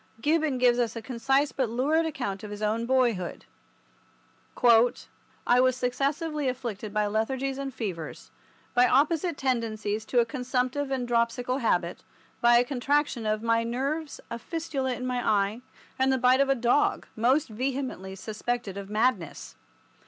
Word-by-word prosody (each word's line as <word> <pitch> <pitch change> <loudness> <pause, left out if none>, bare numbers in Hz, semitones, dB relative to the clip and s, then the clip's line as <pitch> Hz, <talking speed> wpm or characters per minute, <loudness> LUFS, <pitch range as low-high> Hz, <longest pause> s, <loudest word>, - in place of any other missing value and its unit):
Gibbon 305 0 +1
gives 245 -1 +3
us 235 -2 0
a 230 - -5
concise 270 +4 +1
but 260 -4 -1
lurid 300 +8 +1
account 220 -10 -4
of 210 - -6
his 210 +1 -6
own 225 +2 0
boyhood. 240 -9 0 2.0
"I 245 - +4
was 255 0 +4
successively 280 +4 -1
afflicted 230 -5 -5
by 210 0 +1
lethargies 260 +6 -1
and 275 -1 -4
fevers, 185 -10 -6 0.4
by 245 0 +5
opposite 310 +4 +2
tendencies 220 -5 -1
to 250 - -2
a 235 - +4
consumptive 255 +2 -2
and 260 -2 -2
dropsical 240 +2 0
habit, 175 -8 0 0.4
by 240 0 +6
a 240 - +5
contraction 275 -2 0
of 215 +1 0
my 230 0 +2
nerves, 275 +6 -3
a 235 - -4
fistula 275 -3 -3
in 250 - -5
my 250 -1 -1
eye, 205 +3 +1 0.4
and 265 0 +3
the 265 - +2
bite 255 +1 +4
of 275 - +2
a 275 - +4
dog, 245 +4 +2
most 255 +7 +2
vehemently 250 -5 -3
suspected 220 +1 -4
of 200 0 -7
madness. 215 -6 -1
245 Hz, 150 wpm, -27 LUFS, 225-270 Hz, 2.0 s, by